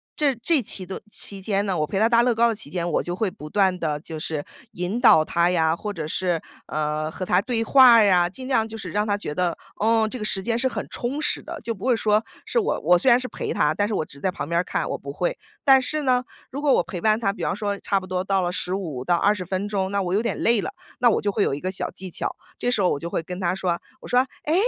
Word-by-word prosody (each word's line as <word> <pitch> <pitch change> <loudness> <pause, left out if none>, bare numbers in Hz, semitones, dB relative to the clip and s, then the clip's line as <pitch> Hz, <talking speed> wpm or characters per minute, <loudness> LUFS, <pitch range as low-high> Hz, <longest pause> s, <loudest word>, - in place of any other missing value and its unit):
这 285 -4 +2
这 270 +5 +2
期 190 -3 -3
顿 190 - -7
期 200 -1 -7
间 200 +1 0
呢， 190 -3 -1
我 150 - 0
陪 195 - -3
她 220 - +5
搭 235 0 +5
乐 240 -1 +2
高 235 +1 +4
的 225 - -1
期 145 - -6
间， 175 0 -2
我 - - +2
就 175 0 -4
会 200 -2 -1
不 150 +1 -10
断 190 -1 +2
地 150 -2 -1
就 160 -2 -7
是 155 -2 -3 0.3
引 180 +7 -2
导 160 -10 +7
她 170 +2 +2
呀， 160 -2 +2
或 210 +2 -5
者 155 -4 -5
是， 175 0 -1 0.3
呃 155 0 -2
和 185 +3 -5
她 180 - +3
对 230 0 -1
话 255 0 +7
儿 225 - +7
呀， 180 -3 +4
尽 255 +7 -9
量 225 -4 +2
就 225 0 -8
是 - - -6
让 210 +1 0
她 205 - +2
觉 150 -7 -5
得， 175 -1 0 0.2
嗯 220 0 +3
这 250 - -5
个 210 - -3
时 195 -2 +1
间 235 0 0
是 260 - +3
很 - - -4
充 270 +5 -3
实 - - 0
的。 335 0 -7
就 230 +1 -2
不 205 +3 -9
会 250 -2 +4
说 215 0 +2 0.2
是 480 - +1
我 420 - 0
我 175 +3 +5
虽 255 +9 +2
然 240 - +7
是 255 - -5
陪 - - -4
她， - - +2
但 205 0 0
是 215 - -3
我 155 - -1
只 - - -15
是 - - -15
在 190 - +1
旁 145 - -5
边 170 0 +2
儿 - - +1
看， - - -2
我 - - -2
不 - - -8
会。 - - -1 0.3
但 270 -2 +6
是 305 +3 -1
呢， 255 -2 +2 0.3
如 280 +3 -5
果 285 -3 +3
我 - - +3
陪 180 - -6
伴 215 +3 +3
她 195 -4 +1
比 205 - -10
方 - - 0
说 205 -1 -2
差 200 - 0
不 185 - -10
多 185 0 -2
到 195 -1 +1
了 175 0 -1
15 180 -8 -3
到 175 - +3
20 195 0 +1
分 190 +3 -2
钟， 190 -2 -1
那 200 0 0
我 180 0 -2
有 210 - +2
点 235 -4 -2
累 230 -2 +3
了， - - -4 0.3
那 240 -1 +5
我 - - +1
就 205 - 0
会 205 - +1
有 - - 0
一 140 - -3
个 185 - -2
小 190 - -3
技 190 0 -7
巧， - - -3 0.2
这 245 - -1
时 220 -5 +1
候 180 - +3
我 140 - -1
就 170 - -5
会 165 - -2
跟 180 +2 -6
她 180 0 0
说， 175 -3 -1 0.2
我 - - -10
说： 245 - +3 0.2
“哎， 310 - 0
200 Hz, 315 characters per minute, -24 LUFS, 175-230 Hz, 0.3 s, 导